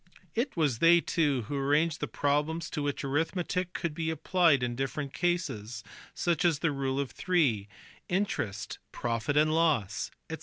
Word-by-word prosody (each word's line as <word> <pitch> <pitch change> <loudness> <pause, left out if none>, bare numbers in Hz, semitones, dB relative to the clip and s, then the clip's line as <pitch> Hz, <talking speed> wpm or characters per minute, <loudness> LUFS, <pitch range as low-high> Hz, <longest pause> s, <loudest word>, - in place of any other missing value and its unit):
It 240 -1 -1
was 145 -8 +1
they 170 +1 +7
too 145 -7 +1
who 130 +7 -5
arranged 145 +3 +2
the - - -2
problems 150 +3 0
to 150 - -2
which 145 -1 -2
arithmetic 170 +5 -1
could 170 -3 -2
be 160 +1 -2
applied 160 -3 +3
in 120 -1 -1
different 135 +2 -3
classes, 120 - -2 0.3
such 170 -2 +1
as 165 -5 +3
rule 135 -4 0
of 140 -3 -2
three, 135 - +1 0.4
interest, 120 - -2
profit 120 +5 -1
and 155 +1 +4
loss, 150 - +1 0.2
&c. - - -3
150 Hz, 155 wpm, -29 LUFS, 135-170 Hz, 0.4 s, they